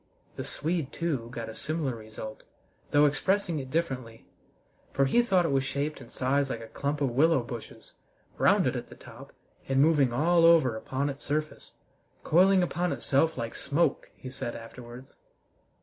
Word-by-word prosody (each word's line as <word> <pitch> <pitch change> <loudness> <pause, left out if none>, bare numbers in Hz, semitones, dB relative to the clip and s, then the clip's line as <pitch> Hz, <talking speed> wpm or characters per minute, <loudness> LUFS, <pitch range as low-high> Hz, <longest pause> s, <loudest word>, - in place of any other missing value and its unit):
The - - -5
Swede, 160 -2 -3
too, 140 -9 -2
got 120 -2 -6
a 110 - -7
similar 150 +1 -2
result, 110 -1 -9 0.5
though 145 0 +5
expressing 170 +3 +1
it 130 -1 -7
differently, 130 -8 -3 0.7
for 135 - +3
he 185 - +4
thought 190 -7 +2
it 165 - 0
was 135 -1 +2
shaped 140 +3 -3
and - - -13
sized 135 +2 0
like 115 - -3
a - - -7
clump 140 +6 -3
of 135 -3 +1
willow 140 +1 +3
bushes, 120 -1 -9 0.5
rounded - - +3
at - - -5
the - - -12
top, - - -13 0.4
and 135 0 +2
moving 145 -4 +4
all 165 +7 +3
over 165 -8 +5
upon 135 +5 -2
its 140 +1 -10
surface 155 +1 -3 0.5
"coiling 185 +3 +4
upon 175 0 -1
itself 160 +3 +1
like 115 -2 -4
smoke," 155 0 0
he 130 - -9
said 120 -2 -5
afterwards. 120 +2 -11
140 Hz, 165 wpm, -28 LUFS, 125-165 Hz, 0.7 s, though